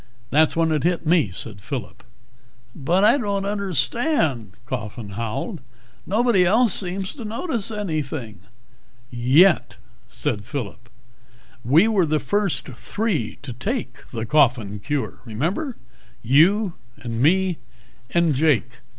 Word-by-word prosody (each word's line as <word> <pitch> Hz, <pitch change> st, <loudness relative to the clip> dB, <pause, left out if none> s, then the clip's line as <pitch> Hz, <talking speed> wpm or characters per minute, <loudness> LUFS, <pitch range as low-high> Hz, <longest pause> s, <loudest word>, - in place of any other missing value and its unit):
"That's 155 Hz, +2 st, +4 dB
when 165 Hz, -1 st, +2 dB
it 155 Hz, -2 st, +1 dB
hit 175 Hz, 0 st, 0 dB
me," 155 Hz, -, +3 dB
said 95 Hz, +2 st, -8 dB
Phillip. 125 Hz, -1 st, -6 dB, 0.7 s
"But 170 Hz, +7 st, +1 dB
I 225 Hz, +7 st, +5 dB
don't 200 Hz, -4 st, -1 dB
understand," 190 Hz, -, 0 dB
Coffin 115 Hz, -3 st, -5 dB
howled. 115 Hz, -, -4 dB, 0.5 s
"Nobody 215 Hz, -1 st, +3 dB
else 220 Hz, +3 st, +3 dB
seems 190 Hz, 0 st, -3 dB
to 255 Hz, -, -9 dB
notice 230 Hz, -, -3 dB
anything 155 Hz, -, -4 dB, 0.5 s
" 120 Hz, +2 st, -33 dB, 0.3 s
"Yet," 190 Hz, -2 st, +3 dB, 0.3 s
said 105 Hz, -1 st, -3 dB
Phillip, 120 Hz, -2 st, -6 dB, 0.7 s
"we 155 Hz, -, +5 dB
were 200 Hz, -7 st, +2 dB
the 155 Hz, 0 st, +1 dB
first 205 Hz, -1 st, -1 dB
three 150 Hz, -, -2 dB
to 130 Hz, -4 st, -6 dB
take 135 Hz, -, -3 dB
the 115 Hz, -1 st, -4 dB
Coffin 120 Hz, -6 st, +2 dB
Cure, 145 Hz, +6 st, -3 dB
remember? 170 Hz, -, -2 dB, 0.5 s
You, 170 Hz, -, +4 dB, 0.2 s
and 115 Hz, -1 st, -4 dB
me 180 Hz, +3 st, +3 dB, 0.5 s
and 170 Hz, -3 st, +2 dB
Jake. 135 Hz, -4 st, +1 dB
155 Hz, 125 wpm, -22 LUFS, 120-200 Hz, 0.7 s, I